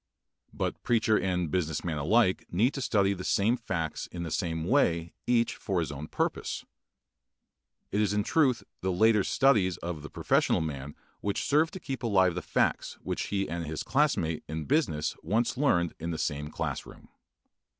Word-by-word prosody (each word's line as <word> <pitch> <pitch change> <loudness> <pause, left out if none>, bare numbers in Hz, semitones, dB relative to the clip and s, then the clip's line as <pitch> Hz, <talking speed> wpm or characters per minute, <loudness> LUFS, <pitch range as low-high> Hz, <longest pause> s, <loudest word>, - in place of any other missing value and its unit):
But - - -3
preacher 110 -2 +2
and 90 -4 -1
business 80 -4 -1
man 80 -4 -2
alike 95 +5 +2
need 115 +10 +2
to 135 - -4
study 100 -5 +2
the 95 -1 -6
same 105 +6 +2
facts 90 -10 -3
in 85 -1 -6
the 85 - -5
same 80 -3 -1
way 85 - +2
each 120 -1 +2
for 95 -3 -1
his 80 -3 -2
own 75 +2 -6
purpose. - - -2 1.3
It 105 - +1
is 105 - +2
in 105 0 +1
truth 130 -2 +2 0.2
the 95 - -1
later 105 +2 +4
studies 105 -10 +3
of 85 -3 -5
the 75 - -8
professional - - +2
man 70 -2 -5 0.2
which 100 -1 -2
serve 155 +3 +3
to 190 - -8
keep 135 -7 -5
alive 95 -6 +3
the 90 - -3
facts - - 0
which - - -2
he 100 -1 -1
and 85 0 -4
his 80 0 -3
classmate 130 - +1
in 80 0 -4
business 130 - +1
once 115 +4 0
learned 90 - +2
in 85 +1 -4
the 80 - -2
same 75 -1 -2
class - - -3
room. - - -14
95 Hz, 180 wpm, -29 LUFS, 80-115 Hz, 1.3 s, later